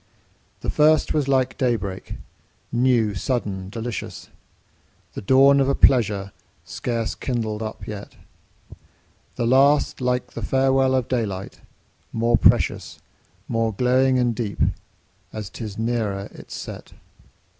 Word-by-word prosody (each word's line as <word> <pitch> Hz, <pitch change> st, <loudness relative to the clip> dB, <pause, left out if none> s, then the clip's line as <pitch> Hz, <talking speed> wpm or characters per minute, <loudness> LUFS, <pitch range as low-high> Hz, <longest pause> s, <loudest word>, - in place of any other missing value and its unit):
The -, -, -2 dB
first 155 Hz, 0 st, +3 dB
was 150 Hz, -3 st, 0 dB
like 130 Hz, -1 st, +1 dB
day 125 Hz, -3 st, +2 dB
break, 95 Hz, -3 st, -6 dB, 0.6 s
new, 120 Hz, -3 st, +2 dB
sudden, 95 Hz, -3 st, -3 dB
delicious, 110 Hz, -2 st, -6 dB, 0.8 s
The -, -, -6 dB
dawn 135 Hz, +5 st, +5 dB
of 135 Hz, 0 st, +2 dB
a 140 Hz, -, +2 dB
pleasure 105 Hz, -6 st, +3 dB, 0.3 s
scarce 115 Hz, -2 st, -3 dB
kindled 110 Hz, -4 st, -3 dB
up 110 Hz, 0 st, -6 dB
yet; 105 Hz, -1 st, -8 dB, 1.2 s
The 120 Hz, -, -1 dB
last 135 Hz, +4 st, +3 dB
like 125 Hz, 0 st, -1 dB
the 115 Hz, -, -6 dB
farewell 135 Hz, +2 st, +2 dB
of 130 Hz, -2 st, 0 dB
daylight, 105 Hz, -7 st, -3 dB, 0.5 s
more 115 Hz, +1 st, +1 dB
precious, -, -, +2 dB, 0.5 s
More 115 Hz, -1 st, 0 dB
glowing 130 Hz, +3 st, +3 dB
and 120 Hz, -2 st, +1 dB
deep, 110 Hz, -3 st, -4 dB, 0.7 s
as 105 Hz, -3 st, -7 dB
'tis 105 Hz, -4 st, -7 dB
nearer 110 Hz, -4 st, -2 dB
its -, -, -10 dB
set. -, -, -8 dB
120 Hz, 125 wpm, -23 LUFS, 110-130 Hz, 1.2 s, dawn